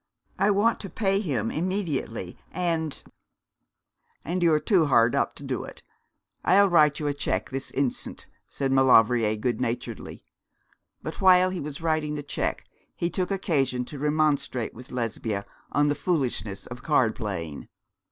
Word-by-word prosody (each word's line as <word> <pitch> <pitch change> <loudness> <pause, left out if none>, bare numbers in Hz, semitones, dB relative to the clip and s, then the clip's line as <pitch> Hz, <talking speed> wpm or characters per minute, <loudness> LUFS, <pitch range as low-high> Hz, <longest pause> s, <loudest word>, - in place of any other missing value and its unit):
I 205 - +4
want 210 +3 +3
to 195 - -7
pay 195 -1 +1
him 130 - -1
immediately, 155 - -2 0.2
and 165 -4 -2 0.6
' - - -45
'And 175 +4 -2
you 170 -1 +4
are 155 - +4
too 175 -4 +3
hard 115 -4 +4
up - - 0
to - - -10
do - - -3
it. - - -11 0.6
I'll 200 +2 +5
write 150 -4 +4
you 150 - -3
a 145 - +1
cheque 145 - -2
this 135 0 -4
instant,' 135 -2 -2 0.2
said 135 -1 -2
Maulevrier 120 -4 +5
goodnaturedly; 120 +1 -3 0.8
but - - -6
while 185 -1 +6
he 185 - -4
was 145 0 -6
writing 155 -2 0
the 145 - -4
cheque 145 - -2 0.3
he 170 0 -1
took 185 -2 -1
occasion 135 -10 0
to 145 +2 -8
remonstrate 150 -5 0
with 125 +3 -12
Lesbia 110 -4 -2 0.3
on 145 +1 +3
the 145 - +2
foolishness 135 - -2
of 120 0 -9
card 125 -7 +2
playing. 85 - -5
145 Hz, 155 wpm, -26 LUFS, 125-175 Hz, 0.8 s, while